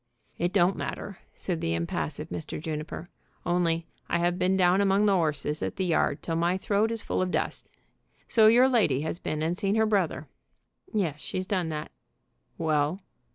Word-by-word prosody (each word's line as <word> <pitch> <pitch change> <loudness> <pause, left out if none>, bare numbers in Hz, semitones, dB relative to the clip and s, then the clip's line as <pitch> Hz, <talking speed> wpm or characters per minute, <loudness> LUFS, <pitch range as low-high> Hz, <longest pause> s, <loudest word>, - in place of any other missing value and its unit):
"It 175 +1 +1
don't 185 -1 +3
matter," 195 - -5 0.2
said 175 -4 -3
the 80 - 0
impassive 85 0 -3
Mr. 85 -2 -5
Juniper, 155 +1 -5 0.4
"only 170 -2 +1 0.2
I - - +2
have 175 +1 0
been 185 +1 +2
down 185 +1 +4
among 200 +1 +3
the 200 -2 +4
'orses 155 -3 0
at - - -2
the 190 - -1
yard 170 -3 +1
till 165 - -2
my 170 +2 +1
throat 205 +3 +1
is 225 -1 -3
full - - -1
of 185 - 0
dust. - - -2 0.6
So 220 -2 +6
your 245 +4 +7
lady 210 - +3
has 160 +2 -3
been 155 0 -2
and 165 +2 0
seen 200 +2 0
her 220 0 +4
brother?" 200 -6 0 0.6
"Yes; 170 -9 -1
she's 185 - -3
done 185 -4 -1
that." 155 -1 -5 0.7
"Well?" 155 +1 +1
175 Hz, 180 wpm, -28 LUFS, 160-195 Hz, 0.7 s, your